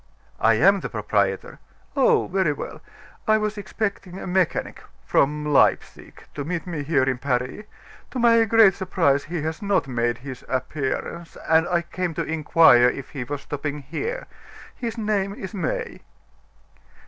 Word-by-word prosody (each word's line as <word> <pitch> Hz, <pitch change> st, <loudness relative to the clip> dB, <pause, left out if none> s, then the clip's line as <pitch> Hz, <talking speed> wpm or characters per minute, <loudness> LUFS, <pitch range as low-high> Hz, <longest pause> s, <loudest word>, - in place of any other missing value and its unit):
"I 115 Hz, +1 st, +4 dB
am 195 Hz, -, +5 dB
the -, -, -5 dB
proprietor." 100 Hz, -3 st, -1 dB, 0.4 s
"Oh! -, -, +4 dB
very 185 Hz, -5 st, +1 dB
well. -, -, -8 dB, 0.5 s
I 215 Hz, 0 st, +5 dB
was 215 Hz, 0 st, -2 dB
expecting 200 Hz, -2 st, -4 dB
a -, -, -7 dB
mechanic 185 Hz, -2 st, -1 dB, 0.2 s
from 150 Hz, +2 st, +1 dB
Leipsic 150 Hz, -2 st, +1 dB
to 145 Hz, -, -4 dB
meet 170 Hz, +3 st, -3 dB
me 165 Hz, -5 st, -4 dB
here 145 Hz, -2 st, +2 dB
in 130 Hz, -1 st, 0 dB
Paris. 125 Hz, +8 st, -2 dB, 0.4 s
To -, -, -6 dB
my 230 Hz, -1 st, +5 dB
great 220 Hz, -2 st, +6 dB
surprise, 165 Hz, -7 st, +1 dB
he 165 Hz, 0 st, -4 dB
has 160 Hz, 0 st, -4 dB
not 200 Hz, -7 st, +1 dB
made 120 Hz, -2 st, -1 dB
his 130 Hz, 0 st, -9 dB
appearance; 135 Hz, +5 st, -3 dB
and 160 Hz, +1 st, +4 dB
I 175 Hz, -1 st, +1 dB
came 175 Hz, -1 st, -4 dB
to -, -, -1 dB
inquire 155 Hz, -6 st, +5 dB
if 135 Hz, +1 st, -7 dB
he 135 Hz, -4 st, -4 dB
was 140 Hz, +3 st, -5 dB
stopping 145 Hz, 0 st, -5 dB
here. 460 Hz, -, -4 dB, 0.5 s
His 235 Hz, -1 st, -5 dB
name 205 Hz, -2 st, -1 dB
is 190 Hz, +1 st, -7 dB
May." 465 Hz, -, -3 dB
160 Hz, 155 wpm, -23 LUFS, 135-195 Hz, 0.5 s, great